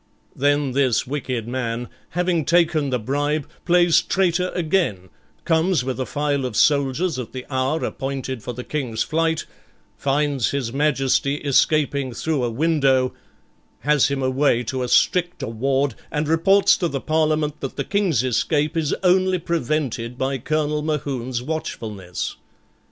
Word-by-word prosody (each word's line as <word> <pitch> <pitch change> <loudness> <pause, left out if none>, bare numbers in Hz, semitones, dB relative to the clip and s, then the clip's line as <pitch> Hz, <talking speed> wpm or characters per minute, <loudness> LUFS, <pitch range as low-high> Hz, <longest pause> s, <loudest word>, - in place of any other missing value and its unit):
Then 145 0 +1
this 130 -3 +2
wicked 130 -4 -3
man, 120 -1 -3 0.3
having 175 -2 +1
taken 165 -3 +2
the 125 - +1
bribe, 145 +5 -1 0.2
plays 175 -1 +4
traitor 180 -1 +1
again, 160 - 0 0.4
comes 165 -2 +2
with 130 0 -3
a 130 - -2
file 145 -2 -1
of 125 -4 -3
soldiers 140 - +2
at 125 - -7
the 130 -1 -6
hour 130 +4 0
appointed 135 -2 -4
for 115 - -5
the 125 +1 -7
King's 125 -7 -2
flight, 160 0 0 0.5
finds 140 -2 +1
His 130 -4 -2
Majesty 140 -1 +1
escaping 140 -2 +1
through 145 +2 -1
a 120 - 0
window, 135 -1 +2 0.7
has 150 -1 +3
him 140 -1 -2
away 130 -2 +2
to 130 +3 -3
a 125 - -1
stricter 175 +7 +2
ward, 135 +4 0 0.2
and 150 0 -1
reports 195 +5 +4
to 175 - 0
the 140 -4 -3
Parliament 155 0 0
that 135 - -5
the - - -2
King's 190 - +1
escape 150 +5 0
is 160 -3 0
only 185 0 +3
prevented 135 -7 -2
by 135 +1 -1
Colonel 150 +2 -1
Mohune's 135 -5 -2
watchfulness. 110 - -5
140 Hz, 145 wpm, -22 LUFS, 130-160 Hz, 0.7 s, plays